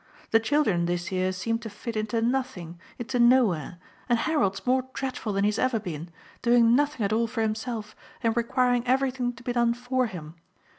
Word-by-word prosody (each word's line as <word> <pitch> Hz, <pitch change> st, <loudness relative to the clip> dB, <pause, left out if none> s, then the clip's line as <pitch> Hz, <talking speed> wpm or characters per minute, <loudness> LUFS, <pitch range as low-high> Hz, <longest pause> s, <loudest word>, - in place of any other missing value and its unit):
The 225 Hz, -, +6 dB
children 225 Hz, -, +1 dB
this 175 Hz, +1 st, -2 dB
year 185 Hz, 0 st, 0 dB
seem 225 Hz, +5 st, -2 dB
to 230 Hz, -1 st, -7 dB
fit 225 Hz, +3 st, -7 dB
into 220 Hz, +1 st, -1 dB
nothing, 235 Hz, -10 st, -2 dB, 0.2 s
into 245 Hz, +1 st, -3 dB
nowhere, 230 Hz, -, +3 dB, 0.3 s
and 240 Hz, -, +4 dB
Harold's 225 Hz, -9 st, 0 dB
more 255 Hz, 0 st, +2 dB
dreadful 260 Hz, -5 st, -3 dB
than 200 Hz, 0 st, 0 dB
he 205 Hz, -, +4 dB
has 210 Hz, -, -2 dB
ever 255 Hz, -3 st, +1 dB
been, 170 Hz, -4 st, -6 dB, 0.3 s
doing 235 Hz, -1 st, +5 dB
nothing 290 Hz, -3 st, +1 dB
at 200 Hz, -, 0 dB
all 230 Hz, +1 st, +2 dB
for 225 Hz, 0 st, -2 dB
himself 220 Hz, 0 st, -3 dB, 0.3 s
and 225 Hz, -1 st, +2 dB
requiring 245 Hz, +1 st, +1 dB
everything 255 Hz, -1 st, +1 dB
to 235 Hz, 0 st, -15 dB
be 245 Hz, -, -2 dB
done 235 Hz, -1 st, +2 dB
for 250 Hz, +1 st, 0 dB
him. 160 Hz, -6 st, -8 dB
230 Hz, 190 wpm, -26 LUFS, 205-250 Hz, 0.3 s, The